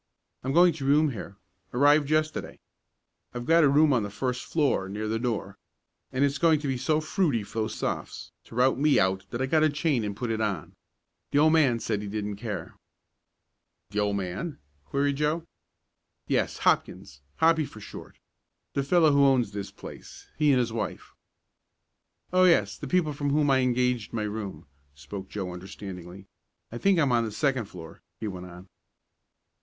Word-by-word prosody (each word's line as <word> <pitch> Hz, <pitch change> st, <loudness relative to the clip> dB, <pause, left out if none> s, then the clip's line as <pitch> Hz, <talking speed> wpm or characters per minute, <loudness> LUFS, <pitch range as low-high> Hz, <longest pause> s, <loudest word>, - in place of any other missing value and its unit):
I'm 130 Hz, -, -1 dB
going 175 Hz, +3 st, +6 dB
to 150 Hz, -3 st, -7 dB
room 145 Hz, +2 st, +4 dB
here. 100 Hz, -4 st, -8 dB, 0.4 s
Arrived 145 Hz, +2 st, +4 dB
yesterday. 155 Hz, 0 st, -1 dB, 0.8 s
I've 120 Hz, 0 st, -4 dB
got 165 Hz, +3 st, +5 dB
a 145 Hz, -, +5 dB
room 145 Hz, +1 st, +5 dB
on 120 Hz, -, +2 dB
the 105 Hz, -, -3 dB
first 125 Hz, +4 st, -3 dB
floor, 140 Hz, -11 st, 0 dB
near 105 Hz, +2 st, -4 dB
the 110 Hz, +1 st, -1 dB
door, 110 Hz, -5 st, -3 dB, 0.5 s
and 135 Hz, +2 st, +2 dB
it's 140 Hz, 0 st, -1 dB
going 160 Hz, -3 st, +4 dB
to 145 Hz, -, -3 dB
be 135 Hz, -, 0 dB
so 155 Hz, +5 st, +1 dB
fruity 155 Hz, -, 0 dB
for 110 Hz, +2 st, -6 dB
those 110 Hz, -, -2 dB
Sophs. -, -, -4 dB
to -, -, -13 dB
rout 130 Hz, +1 st, +3 dB
me 150 Hz, 0 st, +4 dB
out 95 Hz, +1 st, 0 dB
that 120 Hz, +2 st, -2 dB
I -, -, +2 dB
got 155 Hz, +4 st, +2 dB
a 155 Hz, -, +4 dB
chain 145 Hz, -4 st, 0 dB
and 105 Hz, -1 st, -3 dB
put 120 Hz, 0 st, -2 dB
it 110 Hz, 0 st, -1 dB
on. 100 Hz, -7 st, -2 dB, 0.6 s
The -, -, 0 dB
old 155 Hz, +2 st, +5 dB
man 140 Hz, -7 st, +4 dB
said 105 Hz, -2 st, -2 dB
he 105 Hz, -, -6 dB
didn't 105 Hz, 0 st, -4 dB
care." 105 Hz, -6 st, -5 dB, 1.2 s
"The 105 Hz, -, -1 dB
old 105 Hz, -1 st, +1 dB
man?" 100 Hz, -, -4 dB, 0.3 s
queried 140 Hz, -, 0 dB
Joe. 155 Hz, +3 st, 0 dB, 0.8 s
"Yes, -, -, 0 dB
Hopkins, 70 Hz, +1 st, 0 dB
Hoppy 160 Hz, -1 st, +3 dB
for 110 Hz, -, -12 dB
short 105 Hz, -, -11 dB, 0.6 s
the 140 Hz, -, 0 dB
fellow 160 Hz, +2 st, +4 dB
that -, -, +2 dB
owns 130 Hz, -6 st, +4 dB
this 100 Hz, -1 st, -5 dB
place -, -, -11 dB
he 150 Hz, -1 st, +2 dB
and 135 Hz, -, +5 dB
his 120 Hz, -2 st, -1 dB
wife." 115 Hz, -, -5 dB, 1.2 s
"Oh, 185 Hz, 0 st, +5 dB
yes, 105 Hz, -, +3 dB
the -, -, -7 dB
people 175 Hz, -5 st, +1 dB
from 145 Hz, 0 st, -2 dB
whom 145 Hz, 0 st, +2 dB
I 135 Hz, -, +4 dB
engaged 125 Hz, -3 st, 0 dB
my 110 Hz, -2 st, -1 dB
room," 105 Hz, -6 st, -5 dB, 0.3 s
spoke 95 Hz, +7 st, -8 dB
Joe 95 Hz, -3 st, -4 dB
understandingly. 95 Hz, 0 st, -9 dB, 0.5 s
"I 120 Hz, -, -6 dB
think 195 Hz, +3 st, +3 dB
I'm 145 Hz, -6 st, +3 dB
on 120 Hz, -1 st, +3 dB
the 110 Hz, -, -3 dB
second 130 Hz, +1 st, 0 dB
floor," 85 Hz, -4 st, -11 dB, 0.2 s
he 110 Hz, -, -3 dB
went 90 Hz, -2 st, -6 dB
on. 90 Hz, +2 st, -12 dB
125 Hz, 185 wpm, -27 LUFS, 105-150 Hz, 1.2 s, going